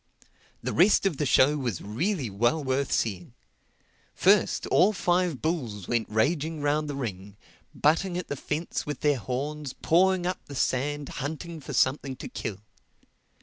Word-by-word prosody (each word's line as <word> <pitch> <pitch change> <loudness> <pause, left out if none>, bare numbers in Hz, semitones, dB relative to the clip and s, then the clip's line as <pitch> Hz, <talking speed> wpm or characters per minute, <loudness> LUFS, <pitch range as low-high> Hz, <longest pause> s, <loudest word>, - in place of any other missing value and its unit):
The - - -2
rest 195 +4 +4
of 180 -7 +1
the 150 - 0
show 145 +4 +4
was 120 -9 -2
really 145 - -2
well 120 +10 +1
worth 135 +1 -1
seeing. 95 -6 -1 0.8
First, - - +3
all 195 +5 +4
five 175 -6 0
bulls 120 - -2
went 120 -2 0
raging 150 +8 0
round 150 +1 +1
the 145 - -3
ring, 100 -6 -6 0.4
butting 175 +4 +2
at 180 - -4
the 145 - -3
fence 150 +4 -3
with 150 - -5
their 145 -3 +2
horns, 140 +5 -4
pawing 185 +2 +2
up 180 +1 -2
the 140 - -8
sand, 140 +3 -1
hunting 160 +3 -5
for 140 - -8
something 135 0 +1
to - - -8
kill. 100 -2 -5
145 Hz, 155 wpm, -27 LUFS, 125-165 Hz, 0.8 s, rest